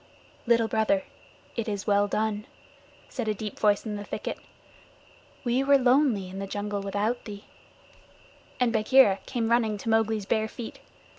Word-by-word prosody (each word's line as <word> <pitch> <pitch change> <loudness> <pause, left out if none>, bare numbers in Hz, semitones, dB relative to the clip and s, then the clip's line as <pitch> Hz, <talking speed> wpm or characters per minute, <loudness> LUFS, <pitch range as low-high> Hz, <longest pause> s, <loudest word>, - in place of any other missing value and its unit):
"Little 230 -1 +4
Brother, 215 -3 +1 0.5
it 230 -2 -2
is 205 -1 -3
well 205 -1 +3
done," 215 0 -1 0.6
said 245 -5 -4
a 215 - 0
deep 210 0 -6
voice 210 0 +2
in 210 -1 -3
the 205 - -6
thicket. - - -5 1.0
"We 250 +1 +1
were 280 0 +5
lonely 250 -6 +3
in 190 +1 -7
the 195 - -4
jungle 205 0 -3
without 205 +5 -2
thee," 205 -1 -8 1.1
and 245 -2 +2
Bagheera 220 -2 +5
came 235 -3 -1
running 225 -3 +2
to 225 - -5
Mowgli's 220 -2 +1
bare 220 +2 +1
feet. 230 +1 -8
220 Hz, 155 wpm, -27 LUFS, 205-235 Hz, 1.1 s, were